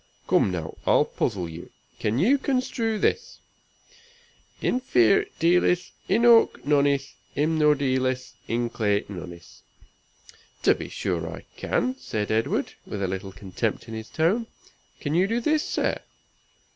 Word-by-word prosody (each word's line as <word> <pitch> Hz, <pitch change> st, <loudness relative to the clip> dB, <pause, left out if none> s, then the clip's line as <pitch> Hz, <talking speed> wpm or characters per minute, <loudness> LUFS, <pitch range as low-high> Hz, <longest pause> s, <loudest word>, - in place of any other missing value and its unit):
Come -, -, +3 dB
now, 85 Hz, -4 st, -4 dB
I'll -, -, +5 dB
puzzle 95 Hz, -6 st, -2 dB
you. 85 Hz, +1 st, -9 dB, 0.3 s
Can 105 Hz, +2 st, 0 dB
you 245 Hz, -, +4 dB
construe 250 Hz, -5 st, -1 dB
this? 460 Hz, -, -1 dB, 1.2 s
"Infir 125 Hz, -, +3 dB
dealis, 180 Hz, +1 st, +2 dB, 0.2 s
inoak 230 Hz, -, +5 dB
noneis; 140 Hz, -1 st, +2 dB, 0.2 s
inmud 150 Hz, -1 st, +3 dB
eelis, 130 Hz, -1 st, 0 dB
inclay 115 Hz, -3 st, 0 dB
noneis." 85 Hz, -3 st, -10 dB, 1.0 s
"To -, -, +6 dB
be -, -, -7 dB
sure 85 Hz, -2 st, -3 dB
I -, -, -9 dB
can," 130 Hz, +1 st, -1 dB
said 110 Hz, -5 st, -3 dB
Edward, 110 Hz, +1 st, 0 dB
with 100 Hz, -1 st, -4 dB
a -, -, +1 dB
little 95 Hz, +1 st, -4 dB
contempt 95 Hz, -1 st, -3 dB
in 115 Hz, -, -8 dB
his 110 Hz, 0 st, -7 dB
tone. 195 Hz, +9 st, +1 dB, 0.5 s
"Can 145 Hz, -, -3 dB
you 180 Hz, +4 st, +3 dB
do 230 Hz, +3 st, 0 dB
this, 305 Hz, +5 st, +2 dB
sir? -, -, -1 dB
130 Hz, 130 wpm, -25 LUFS, -, 1.2 s, To